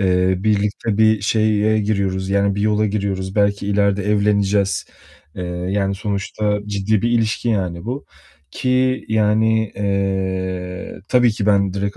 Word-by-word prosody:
eee, 95 -1 +2
birlikte 105 +1 0
bir 110 -1 +4
şeye 110 +1 +2
giriyoruz, 100 -2 -1
yani 100 0 +2
bir 100 - -3
yola 105 0 +2
giriyoruz, 100 -2 -3
belki 100 -1 +1
ileride 100 0 +1
evleneceğiz. 100 -1 +1 0.5
Eee, 90 - -5
yani 95 +3 -2
sonuçta 105 +1 -2
ciddi 105 0 0
bir 120 - +1
ilişki 115 0 0
yani 90 -6 -1
bu, 130 +4 -4 0.5
ki 130 - 0
yani, 110 0 +2
eee, 95 -2 -2
tabii 125 -2 +4
ki 105 -1 -3
ben 100 -2 +2
direkt 100 0 -3
100 Hz, 135 wpm, -19 LUFS, 95-110 Hz, 0.5 s, bir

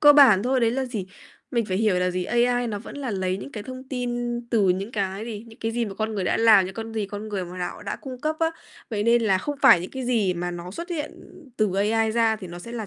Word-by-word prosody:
cơ 295 -1 +9
bản 260 -10 +7
thôi 255 +2 +1
đấy 230 -1 +3
là 265 +3 -1
gì, 225 -7 -4 0.4
mình 235 -3 +1
phải 185 -2 -2
hiểu 205 -3 +2
là 180 0 +1
gì? 180 0 -2
AI 245 +2 +2
nó 210 -3 -3
vẫn 225 - -10
là 275 -4 -3
lấy 185 -2 -1
những 235 +8 -8
cái 210 - -5
thông 255 +2 -8
tin 240 -2 -2
từ 210 -5 +3
những 195 +5 0
cái 195 -1 -2
gì, 225 -2 -6
những 225 -1 -15
cái 225 0 -2
gì 235 0 0
mà 200 -3 -6
con 220 +1 -2
người 195 -3 -1
đã - - +1
làm, 220 -4 +6
những 190 +1 -6
con 225 +1 -6
gì 215 -2 -1
con 205 +2 -6
người 195 -3 -2
mà 180 +1 -9
nạo 180 +2 -4
đã 200 - -4
cung 255 -2 -9
cấp 310 +2 -1
á. 325 0 +3 0.4
Vậy 210 -2 -1
nên 235 +2 +4
là 195 -4 +3
không 290 +9 -3
phải 235 -10 +8
những 180 - -6
cái 265 -1 -5
gì 220 -7 +1
mà 175 +1 -3
nó 175 0 -7
xuất 335 - -7
hiện 310 -3 -3 0.4
từ 215 -3 +1
AI 220 +3 +2
ra 225 -1 +2
thì 205 -3 -8
nó 175 0 -8
sẽ 235 +7 -9
là 225 -3 -4
220 Hz, 290 wpm, -25 LUFS, 195-240 Hz, 0.4 s, cơ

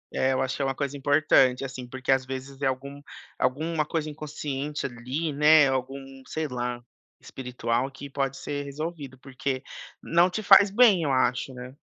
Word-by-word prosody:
É, 130 0 +2
eu 130 - 0
acho 130 0 -2
que - - -4
é - - +1
uma 135 -1 -1
coisa 140 0 -3
importante, 140 -2 +3
assim, 130 -2 -7
porque 130 +1 -3
às 130 0 +3
vezes 135 +1 -7
é 135 - +2
algum 140 +2 -4 0.4
alguma 155 +4 0
coisa 155 +1 -3
inconsciente 150 -1 -5
ali, 135 +5 -3
né, 150 0 +6
algum, 135 +1 -4
sei 160 -1 -3
lá, 120 -1 -4 0.4
espiritual 125 -1 -3
que 140 0 -10
pode 135 -1 -2
ser 145 0 -4
resolvido, 145 -2 -6
porque 130 0 -4 0.4
não 170 +2 +3
te 215 +4 -4
faz 200 0 +7
bem 205 -4 +5
eu 145 -3 0
acho, 130 0 +1
né. 125 +2 -9
135 Hz, 175 wpm, -26 LUFS, 130-150 Hz, 0.4 s, faz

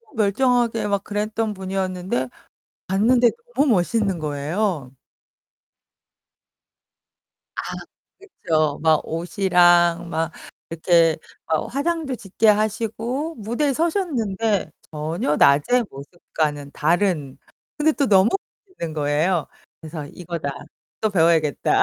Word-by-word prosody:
멀쩡하게 230 +1 +2
막 200 -1 0
그랬던 215 +1 -2
분이었는데 185 -7 -2 0.6
봤는데 235 +6 +4 0.3
너무 285 +1 +3
멋있는 195 -1 +1
거예요. 150 0 -2 2.6
아 - - -2 0.6
그쵸. 155 - -1
막 160 -2 +4
옷이랑 175 0 +3
막 165 +1 -1 0.4
이렇게 165 0 +3 0.3
막 160 +9 -2
화장도 310 -1 -1
짙게 215 +2 0
하시고 225 +8 0
무대에 240 +7 -1
서셨는데 230 - 0 0.2
전혀 155 0 -1
낮의 225 - +4
모습과는 145 0 -4
다른. 160 -4 0 0.4
근데 310 +1 +3
또 280 -2 0
너무 195 -1 +5 0.4
멋있는 170 - -6
거예요. 150 +2 +1 0.3
그래서 155 -2 -7
'이거다. 170 -2 -5 0.5
또 215 - +1
배워야겠다.' 165 -5 +3
190 Hz, 230 characters per minute, -22 LUFS, 160-225 Hz, 2.6 s, 너무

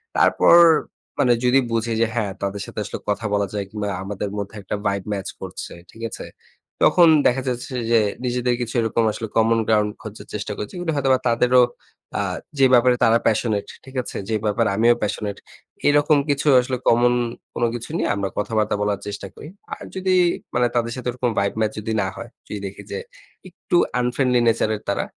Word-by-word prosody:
তারপর 170 - +5 0.6
মানে 125 -3 +4
যদি 130 +2 +5
বুঝি 115 0 0
যে, 115 - +5
হ্যাঁ, 105 -4 -1
তাদের 100 0 -3
সাথে - - -7
আসলে - - -5
কথা 105 +2 -1
বলা 100 -1 +1
যায় 100 -1 -2
কিংবা 105 0 -4 0.2
আমাদের 100 +1 -4
মধ্যে 100 +1 -5
একটা 95 - -4
ভাইব 100 -1 0
ম্যাচ 100 -1 -4
করছে। - - -7 0.2
ঠিক 115 - -14
আছে? - - -8 0.6
তখন 175 -2 +6 0.2
দেখা 130 +2 +1
যাচ্ছে 125 +2 -3 0.2
যে, 115 - +6 0.3
নিজেদের 125 0 0
কিছু 120 - -4
এরকম 115 +1 +1
আসলে 110 - -5
কমন 115 +1 +4
গ্রাউন্ড 105 -1 +3
খোঁজার 110 0 -9
চেষ্টা 105 0 -4
করছি। 105 - -6
কিন্তু 175 -2 -1
হয়তোবা 135 -2 +2
তাদেরও 125 +2 +4 0.6
আ - - +1 0.4
যে 135 - +7
ব্যাপারে 125 0 +5
তারা 115 +1 +5
passionate 110 -2 0 0.2
ঠিক 130 0 -13
আছে? - - -7
যে 110 - +1
ব্যাপারে 105 +1 +1
আমিও 115 +3 +5
passionate 105 -1 -3 0.5
এরকম 145 +1 +4
কিছু 140 +1 0
আসলে 125 +1 -1
কমন 120 +1 +4 0.4
কোন 120 - -2
কিছু 120 -1 -7
নিয়ে - - 0
আমরা 100 -1 -2
কথাবার্তা 105 0 0
বলার 105 -1 0
চেষ্টা 100 -1 -5
করি। - - -10 0.3
আর - - -12
যদি 190 0 0 0.4
মানে 120 0 +3
তাদের 115 -1 0
সাথে 125 -1 -6
ওরকম 125 0 -1
ভাইব 100 0 0
ম্যাচ 110 -1 +1
যদি 110 +1 -4
না 95 - -1
হয়, 115 0 -8 0.2
যদি 105 - -5
দেখি 100 +1 -7
যে - - -3 0.5
একটু 175 - -4 0.2
unfriendly 125 0 +1
nature 110 -1 +2
এর - - -18
তারা। 100 - -1
115 Hz, 190 wpm, -22 LUFS, 105-125 Hz, 0.6 s, যে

